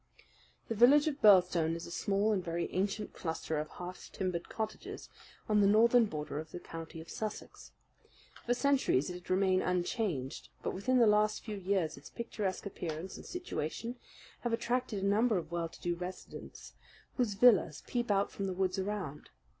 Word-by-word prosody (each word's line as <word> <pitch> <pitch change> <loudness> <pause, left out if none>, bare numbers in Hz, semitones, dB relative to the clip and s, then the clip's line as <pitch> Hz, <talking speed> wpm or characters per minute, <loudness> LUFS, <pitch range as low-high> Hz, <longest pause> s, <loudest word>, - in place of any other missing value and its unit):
The - - -1
village 275 +7 +6
of 295 -2 -2
Birlstone 180 -5 +5
is 170 - -6
a - - -9
small 200 +4 +1
and 195 -4 0
very 170 0 -3
ancient 200 +3 -1
cluster 160 -2 -3
of 155 0 -4
half 180 +1 -8
timbered 180 -3 -3
cottages 220 -1 -5 0.4
on 210 -1 +4
the 200 - +5
northern 230 +3 +6
border 150 -6 -4
of 160 0 -7
the 175 - -7
county 165 -1 -8
of 160 - -12
Sussex. 215 -1 -6 0.8
For 245 - +3
centuries 260 - +2
it - - -5
had 180 0 -10
remained 185 0 +3
unchanged; 180 - -1
but - - -1
within 255 +7 +1
the 240 - +6
last 210 0 +3
few 215 -2 -5
years 185 -5 0
its 140 - -12
picturesque 210 -5 -3
appearance 175 -2 -5
and - - -10
situation 240 - -4 0.4
have 240 -1 -2
attracted 240 -3 -1
a - - +2
number 215 +2 +3
of 165 -2 -5
well 170 -1 -2
to - - -15
do 175 - 0
residents, 180 +2 -8 0.4
whose 235 -6 +1
villas 200 -9 +5
peep 240 -2 -2
out 200 0 +2
from 195 - -3
the 190 - -2
woods 185 +1 0
around. 190 -7 -4
195 Hz, 180 wpm, -33 LUFS, 170-220 Hz, 0.8 s, village